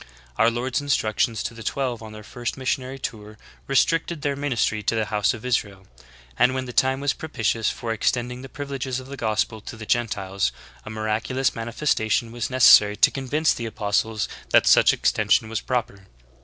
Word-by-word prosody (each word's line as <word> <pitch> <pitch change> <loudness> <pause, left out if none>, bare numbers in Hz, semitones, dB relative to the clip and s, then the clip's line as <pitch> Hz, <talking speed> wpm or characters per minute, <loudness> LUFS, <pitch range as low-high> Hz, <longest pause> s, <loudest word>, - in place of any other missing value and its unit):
Our 115 - +5
Lord's 120 +4 -2
instructions 115 -5 0
to - - -4
the 115 - -11
chosen - - -2
twelve 130 -4 -2
on 110 -1 -9
their 110 0 -10
first 120 +4 -5
missionary 130 0 -2
tour 110 -4 -7 0.3
restricted 165 +3 +1
their 140 -1 0
ministry 125 -6 -1
to 110 - 0
the 110 -1 0
House 105 -1 +1
of 115 - -11
Israel;'^ 100 -6 -1 0.5
and 130 +1 +4
when 130 0 -2
the 125 - -8
time 130 +2 +2
was 145 -1 +1
propitious 115 -7 -1
for 115 -1 -3
extending 125 +3 -1
the 135 - -10
privileges 135 -3 -4
of 130 - -10
the 140 - -6
gospel 110 -2 -1
to 115 - -9
the 110 - -8
Gentiles, 100 - -1 0.3
a - - -7
miraculous 110 +5 -1
manifestation 115 -1 -1
was 120 -1 -3
necessary 105 -5 +7
to 105 - +4
convince 145 +4 0
the 115 - -5
apostles 110 0 -1 0.2
that - - +5
such - - +6
extension 110 - +1
was 115 -2 -2
proper. 110 -6 -3
115 Hz, 185 wpm, -23 LUFS, 110-130 Hz, 0.5 s, necessary